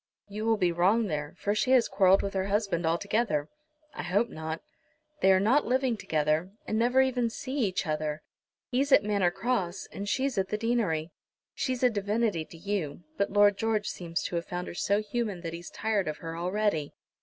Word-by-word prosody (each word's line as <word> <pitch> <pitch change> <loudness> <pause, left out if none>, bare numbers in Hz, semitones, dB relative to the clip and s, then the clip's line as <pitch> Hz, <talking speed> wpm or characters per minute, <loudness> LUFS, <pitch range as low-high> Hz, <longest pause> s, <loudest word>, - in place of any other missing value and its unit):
"You 210 +2 -5
will 225 -1 +3
be 180 -4 +2
wrong 190 +7 +3
there, 150 -4 -3
for 205 - 0
she 215 +4 0
has 250 -3 +5
quarrelled 190 0 +4
with 200 - -3
her 190 0 -1
husband 200 -5 0
altogether." 170 -2 0 0.4
"I - - -5
hope 205 +7 +1
not." 160 +1 -5 0.6
"They 190 - +6
are 190 - +5
not 240 +9 +3
living 255 -1 +1
together, 160 -3 0 0.2
and 220 - -1
never 250 +3 +4
even 250 -3 +1
see 260 +3 -6
each 205 -9 0
other. 155 -1 -2 0.5
He's 275 +3 +1
at 210 - +7
Manor 200 -4 +2
Cross, 195 -2 -2
and 200 +1 -5
she's 265 -3 0
at 190 - -1
the 210 - -1
deanery. 210 -9 0 0.4
She's 255 -1 -2
a 250 - +6
divinity 205 -4 0
to 165 - -13
you, 175 -3 -3
but 200 +4 0
Lord 205 0 +4
George 220 -2 0
seems 170 -2 -3
to 175 - -2
have 170 - -3
found 180 0 -4
her - - -7
so 200 +4 +1
human 210 -4 -3
that 165 -1 -5
he's 170 +1 -7
tired 210 -4 -1
of 155 - -3
her 165 0 -6
already." 180 -3 -1
200 Hz, 200 wpm, -29 LUFS, 170-225 Hz, 0.6 s, at